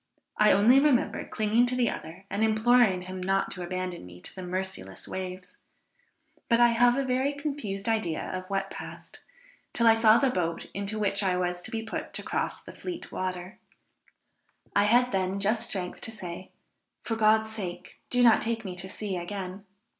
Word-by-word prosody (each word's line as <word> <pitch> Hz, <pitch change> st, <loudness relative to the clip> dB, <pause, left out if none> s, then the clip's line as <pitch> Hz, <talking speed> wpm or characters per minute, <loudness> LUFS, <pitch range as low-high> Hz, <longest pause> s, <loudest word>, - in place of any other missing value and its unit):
I 210 Hz, -, +5 dB
only 225 Hz, +7 st, +6 dB
remember 275 Hz, -4 st, +2 dB
clinging 220 Hz, +3 st, +2 dB
to 250 Hz, -, -2 dB
the 245 Hz, -2 st, +2 dB
other 175 Hz, +4 st, -8 dB
and 210 Hz, -, 0 dB
imploring 220 Hz, -3 st, +4 dB
him 185 Hz, 0 st, -6 dB
not 195 Hz, +1 st, 0 dB
to 180 Hz, -, -6 dB
abandon 185 Hz, -, -4 dB
me 90 Hz, 0 st, -12 dB
to -, -, -11 dB
the 190 Hz, -, -8 dB
merciless 180 Hz, -, -5 dB
waves. 185 Hz, -1 st, -6 dB, 0.9 s
But 235 Hz, -1 st, +4 dB
I 240 Hz, 0 st, +7 dB
have 240 Hz, +2 st, +4 dB
a 275 Hz, -, 0 dB
very 260 Hz, +2 st, +1 dB
confused 275 Hz, -9 st, -4 dB
idea 215 Hz, -8 st, 0 dB
of 185 Hz, +1 st, -5 dB
what 195 Hz, 0 st, -2 dB
passed, -, -, -9 dB, 0.5 s
till 235 Hz, -, +1 dB
I 225 Hz, -, +8 dB
saw 225 Hz, 0 st, +6 dB
the 270 Hz, 0 st, +2 dB
boat, 170 Hz, -6 st, -2 dB
into 200 Hz, +2 st, -3 dB
which 200 Hz, -1 st, 0 dB
I 185 Hz, -2 st, +1 dB
was 180 Hz, 0 st, -1 dB
to -, -, -8 dB
be 225 Hz, -1 st, -3 dB
put 225 Hz, -, -6 dB
to -, -, -4 dB
cross -, -, -2 dB
the -, -, -10 dB
Fleet 355 Hz, -2 st, -7 dB
water; 185 Hz, +1 st, -4 dB, 1.2 s
I 200 Hz, -, +5 dB
had 245 Hz, +4 st, +4 dB
then 190 Hz, 0 st, 0 dB
just 220 Hz, +3 st, +1 dB
strength 180 Hz, -3 st, -4 dB
to -, -, -2 dB
say, 185 Hz, -4 st, -7 dB, 0.5 s
"For 225 Hz, -, -2 dB
God's 220 Hz, 0 st, +3 dB
sake 190 Hz, -5 st, -7 dB
do 245 Hz, 0 st, +3 dB
not 230 Hz, -2 st, +6 dB
take 225 Hz, -1 st, -2 dB
me 185 Hz, -2 st, -5 dB
to 190 Hz, +1 st, -3 dB
sea 195 Hz, -1 st, -3 dB
again." 190 Hz, +2 st, -6 dB
200 Hz, 185 wpm, -28 LUFS, 185-230 Hz, 1.2 s, I